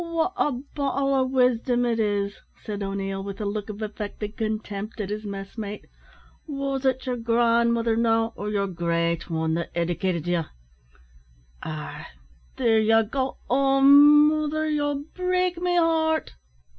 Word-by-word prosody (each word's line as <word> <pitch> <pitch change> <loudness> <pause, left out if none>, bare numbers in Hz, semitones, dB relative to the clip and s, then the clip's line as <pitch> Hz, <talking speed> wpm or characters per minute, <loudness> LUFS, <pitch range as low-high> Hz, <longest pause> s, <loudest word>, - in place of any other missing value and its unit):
"Wot 335 +2 -1
a 295 -6 +1
bottle 275 +1 -2
o' 265 -1 +3
wisdom 250 -1 +2
it 230 -1 0
is," 205 -2 -1 0.2
said 205 -1 -5
O'Neil, 195 0 -3
with 200 0 -7
a 210 - -3
look 205 +1 -3
of 210 +1 -6
affected 210 0 -6
contempt 215 -1 -4
at 205 -1 -3
his 215 +1 -4
messmate. 200 +1 -6 0.6
"Wos 275 -2 -3
it 260 -1 +1
yer 250 -1 -1
grandmother, 235 0 +2
now, 225 0 +1
or 205 - -4
yer 200 -1 0
great 170 -2 -1
wan, 160 -1 -1
that 170 +1 -2
edicated 170 0 -1
ye? 175 -1 +1 1.2
Arrah, 155 -1 -6 0.5
there 225 -1 +3
ye 225 +1 +4
go! 260 +4 -3
Oh, 270 +1 +2
morther, 300 +2 +6
ye'll 290 -1 -1
break 365 -1 0
me 355 0 +1
heart!" 320 -1 +1
230 Hz, 145 wpm, -25 LUFS, 200-275 Hz, 1.2 s, morther